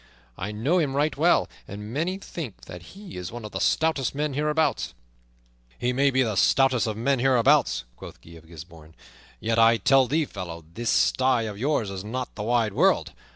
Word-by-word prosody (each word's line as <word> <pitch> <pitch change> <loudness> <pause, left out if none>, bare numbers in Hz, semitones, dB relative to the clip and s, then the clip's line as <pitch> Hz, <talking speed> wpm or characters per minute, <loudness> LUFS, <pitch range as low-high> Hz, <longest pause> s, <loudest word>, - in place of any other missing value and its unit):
I 100 +8 -5
know 130 +13 +1
him 140 -5 -1
right 150 +2 +1
well, 170 +5 +3 0.2
and 105 +3 -8
many 170 +7 -1
think 160 - -8
that 90 +1 -9 0.2
he 200 - -10
is 90 -1 -6
one 120 -1 -8
of 105 - -8
the - - -4
stoutest 155 -6 +1
men 150 0 -1
hereabouts." 150 - 0 0.8
"He 125 +1 -1
may 140 +2 +3
be 130 -1 +2
the 110 -4 -2
stoutest 130 0 +3
of 110 -1 -3
men 135 +3 +1
hereabouts," 135 - +3
quoth - - -11
Guy 85 - -17
of 80 -1 -14
Gisbourne, 80 -1 -13 0.4
"yet, 115 +1 0
I 115 0 +6
tell 135 +1 +4
thee, 155 +4 +1
fellow, 85 - -8
this 115 +3 -3
sty 130 -2 +2
of 105 -2 -6
yours 125 -6 0
is 95 -1 -6
not 125 +4 -5
the 105 - -7
wide 115 -1 +1
world. - - +2
120 Hz, 195 wpm, -25 LUFS, 105-140 Hz, 0.8 s, I